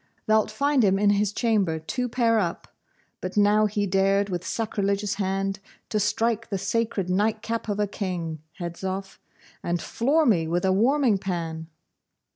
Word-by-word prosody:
Thou'lt 215 Hz, -1 st, +3 dB
find 280 Hz, +4 st, +2 dB
him 195 Hz, -1 st, +4 dB
in 205 Hz, 0 st, +4 dB
his 205 Hz, 0 st, +1 dB
chamber 205 Hz, -8 st, +1 dB
two 250 Hz, +11 st, -3 dB
pair 230 Hz, -2 st, +2 dB
up. 175 Hz, -4 st, -3 dB, 0.5 s
But 185 Hz, +2 st, -5 dB
now 210 Hz, +1 st, +4 dB
he 205 Hz, 0 st, -1 dB
dared, 195 Hz, +1 st, +2 dB
with 180 Hz, -2 st, -3 dB
sacrilegious 200 Hz, -2 st, -1 dB
hand, 195 Hz, +1 st, -1 dB, 0.3 s
to 215 Hz, -, 0 dB
strike 225 Hz, +2 st, 0 dB
the 195 Hz, -, -1 dB
sacred 215 Hz, -2 st, -1 dB
night 210 Hz, +4 st, 0 dB
cap 230 Hz, 0 st, -3 dB
of 205 Hz, 0 st, -1 dB
a 210 Hz, -, +3 dB
king 175 Hz, -6 st, -4 dB, 0.2 s
Hedzoff, 190 Hz, +3 st, -5 dB, 0.4 s
and 175 Hz, 0 st, -1 dB
floor 290 Hz, -, +1 dB
me 175 Hz, -, +3 dB
with 175 Hz, +3 st, 0 dB
a 190 Hz, -, +3 dB
warming 240 Hz, 0 st, +3 dB
pan! 165 Hz, -4 st, -4 dB
200 Hz, 160 wpm, -25 LUFS, 185-220 Hz, 0.5 s, him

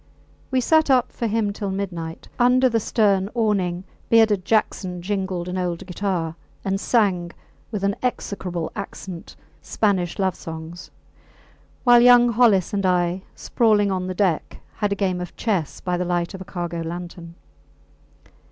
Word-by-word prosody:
We 260 Hz, -1 st, +1 dB
sat 315 Hz, +4 st, +3 dB
up 255 Hz, -2 st, +3 dB
for 235 Hz, -, -3 dB
him 215 Hz, -1 st, 0 dB
till 200 Hz, -1 st, -4 dB
midnight. 175 Hz, -4 st, -5 dB
Under 250 Hz, +1 st, +5 dB
the 230 Hz, -2 st, +1 dB
stern 200 Hz, -3 st, +2 dB
awning 190 Hz, -6 st, 0 dB, 0.3 s
bearded 220 Hz, -5 st, +4 dB
Jackson 195 Hz, -4 st, 0 dB
jingled 190 Hz, -1 st, -3 dB
an 185 Hz, +1 st, -3 dB
old 175 Hz, -2 st, -3 dB
guitar 180 Hz, -3 st, -2 dB, 0.3 s
and 195 Hz, 0 st, 0 dB
sang, 195 Hz, -7 st, +1 dB, 0.4 s
with 210 Hz, -3 st, -4 dB
an 200 Hz, 0 st, +1 dB
execrable 185 Hz, -8 st, -3 dB
accent, 180 Hz, -3 st, -7 dB, 0.3 s
Spanish 190 Hz, -5 st, 0 dB
love 190 Hz, -2 st, +1 dB
songs; 165 Hz, +1 st, -8 dB, 0.9 s
while 240 Hz, -1 st, +7 dB
young 245 Hz, 0 st, +7 dB
Hollis 220 Hz, -6 st, +3 dB
and 200 Hz, -1 st, 0 dB
I, 180 Hz, 0 st, +1 dB
sprawling 210 Hz, -4 st, +2 dB
on 185 Hz, -1 st, -2 dB
the 185 Hz, -, -4 dB
deck, 180 Hz, -5 st, -1 dB
had 205 Hz, -2 st, -1 dB
a -, -, +1 dB
game 185 Hz, -3 st, -1 dB
of 180 Hz, -, -7 dB
chess 190 Hz, -10 st, -1 dB
by 180 Hz, -1 st, -1 dB
the 180 Hz, -, -1 dB
light 175 Hz, 0 st, -1 dB
of 190 Hz, -, -8 dB
a -, -, -7 dB
cargo 175 Hz, -2 st, -4 dB
lantern. 170 Hz, 0 st, -7 dB
190 Hz, 150 wpm, -23 LUFS, 175-215 Hz, 0.9 s, while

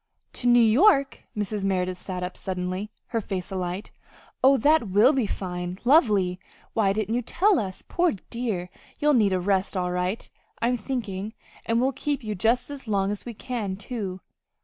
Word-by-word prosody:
"To 245 Hz, -, -2 dB
New 240 Hz, 0 st, +6 dB
York?" 275 Hz, -, +4 dB
Mrs. 210 Hz, 0 st, -2 dB
Merideth 185 Hz, -1 st, 0 dB
sat 180 Hz, 0 st, -5 dB
up 180 Hz, 0 st, -4 dB
suddenly, 185 Hz, +2 st, -3 dB, 0.2 s
her 230 Hz, -2 st, -1 dB
face 190 Hz, -1 st, -4 dB
alight. 185 Hz, +1 st, -4 dB, 0.5 s
"Oh, 270 Hz, +1 st, +7 dB
that 290 Hz, -3 st, +3 dB
will 210 Hz, +9 st, +5 dB
be 255 Hz, -6 st, +1 dB
fine 180 Hz, -2 st, -4 dB
lovely! 210 Hz, -, +4 dB, 0.3 s
Why 205 Hz, -3 st, +3 dB
didn't 215 Hz, +1 st, -1 dB
you 245 Hz, -, +1 dB
tell 385 Hz, -, +2 dB
us? 190 Hz, -3 st, -5 dB
Poor 350 Hz, -2 st, +2 dB, 0.2 s
dear, 215 Hz, -7 st, -3 dB, 0.3 s
you'll 295 Hz, 0 st, +3 dB
need 215 Hz, -6 st, +4 dB
a 185 Hz, -, +1 dB
rest 190 Hz, +1 st, 0 dB
all 180 Hz, -1 st, 0 dB
right, 180 Hz, +4 st, -2 dB, 0.3 s
I'm 245 Hz, +2 st, +2 dB
thinking, 215 Hz, -4 st, -4 dB, 0.3 s
and 230 Hz, 0 st, +2 dB
we'll 260 Hz, +2 st, +2 dB
keep 285 Hz, +1 st, -2 dB
you 215 Hz, -1 st, -3 dB
just 230 Hz, +8 st, +1 dB
as 275 Hz, -4 st, -8 dB
long 200 Hz, -2 st, +1 dB
as 205 Hz, -, -5 dB
we 235 Hz, -2 st, -6 dB
can, 215 Hz, -4 st, -3 dB
too." 195 Hz, -3 st, -5 dB
210 Hz, 175 wpm, -25 LUFS, 185-245 Hz, 0.5 s, Oh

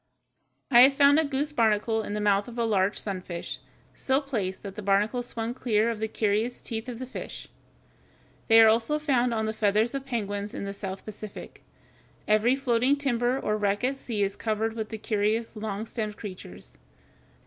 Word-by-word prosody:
I 240 Hz, -, +8 dB
have 270 Hz, +2 st, +8 dB
found 285 Hz, +2 st, +6 dB
a -, -, +3 dB
goose 285 Hz, +1 st, -1 dB
barnacle 225 Hz, -3 st, +2 dB
in 205 Hz, -1 st, -5 dB
the -, -, -2 dB
mouth 205 Hz, -1 st, +2 dB
of 240 Hz, 0 st, -9 dB
a 235 Hz, -, +1 dB
large 200 Hz, -2 st, +1 dB
sunfish, 185 Hz, -4 st, -5 dB, 0.3 s
so 265 Hz, 0 st, +1 dB
placed 220 Hz, -10 st, -3 dB
that 200 Hz, -2 st, -6 dB
the 210 Hz, -, -7 dB
barnacle 205 Hz, +5 st, +1 dB
swung 235 Hz, -1 st, -4 dB
clear 230 Hz, -2 st, +1 dB
of 225 Hz, -, -5 dB
the 220 Hz, -, -1 dB
curious 220 Hz, +3 st, 0 dB
teeth 225 Hz, +2 st, -5 dB
of 240 Hz, -, -6 dB
the 255 Hz, -, -5 dB
fish. 255 Hz, -, -8 dB, 1.0 s
They 225 Hz, -1 st, +7 dB
are -, -, +7 dB
also 230 Hz, +7 st, +2 dB
found 260 Hz, -5 st, +1 dB
on 220 Hz, -1 st, -1 dB
the 220 Hz, -, -2 dB
feathers 215 Hz, +2 st, +1 dB
of 275 Hz, 0 st, -5 dB
penguins 205 Hz, -4 st, -3 dB
in -, -, -4 dB
the 200 Hz, -, -4 dB
South 195 Hz, -1 st, -6 dB
Pacific. 215 Hz, -1 st, -9 dB, 0.7 s
Every 215 Hz, +4 st, +4 dB
floating 255 Hz, 0 st, +2 dB
timber 255 Hz, -2 st, 0 dB
or 210 Hz, -4 st, -1 dB
wreck 205 Hz, +1 st, 0 dB
at 265 Hz, +2 st, +1 dB
sea 230 Hz, -6 st, -2 dB
is 195 Hz, 0 st, -1 dB
covered 220 Hz, 0 st, -1 dB
with 220 Hz, -1 st, -4 dB
the 220 Hz, -, -5 dB
curious, 215 Hz, +2 st, -1 dB
long 215 Hz, 0 st, -4 dB
stemmed 215 Hz, -2 st, -4 dB
creatures. 185 Hz, -, -10 dB
220 Hz, 190 wpm, -27 LUFS, 205-245 Hz, 1.0 s, I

